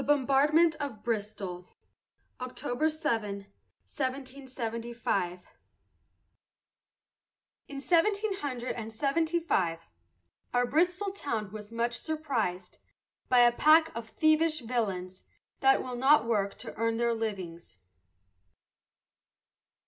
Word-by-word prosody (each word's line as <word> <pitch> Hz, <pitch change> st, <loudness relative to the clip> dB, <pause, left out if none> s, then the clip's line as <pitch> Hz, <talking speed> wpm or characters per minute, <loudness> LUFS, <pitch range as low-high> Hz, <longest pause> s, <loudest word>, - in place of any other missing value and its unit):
THE -, -, -7 dB
BOMBARDMENT 290 Hz, +4 st, +4 dB
OF 270 Hz, -8 st, -5 dB
BRISTOL 205 Hz, -5 st, -4 dB, 0.7 s
[October 255 Hz, +3 st, -1 dB
7, 235 Hz, -10 st, -1 dB, 0.5 s
1775] 240 Hz, -8 st, -3 dB, 2.2 s
In 275 Hz, -, -7 dB
seventeen 400 Hz, +7 st, +2 dB
hundred 255 Hz, -5 st, -3 dB
and 225 Hz, -1 st, -6 dB
seventy 315 Hz, +8 st, 0 dB
five, 170 Hz, -, -1 dB, 0.7 s
Our 245 Hz, 0 st, +4 dB
Bristol 360 Hz, +8 st, +1 dB
town 225 Hz, -, -3 dB
was 210 Hz, 0 st, -9 dB
much 235 Hz, +1 st, -1 dB
surprised 235 Hz, -, -3 dB, 0.5 s
By 250 Hz, -1 st, +6 dB
a 240 Hz, 0 st, +7 dB
pack 315 Hz, +5 st, +4 dB
of 230 Hz, -1 st, -6 dB
thievish 310 Hz, +1 st, +2 dB
villains, 195 Hz, -6 st, -3 dB, 0.4 s
That 270 Hz, 0 st, +4 dB
will 255 Hz, -1 st, -5 dB
not 265 Hz, +1 st, +5 dB
work 205 Hz, -4 st, 0 dB
to -, -, -7 dB
earn 230 Hz, 0 st, 0 dB
their 235 Hz, 0 st, +2 dB
livings. 190 Hz, -, -5 dB
245 Hz, 100 wpm, -29 LUFS, 215-300 Hz, 2.2 s, a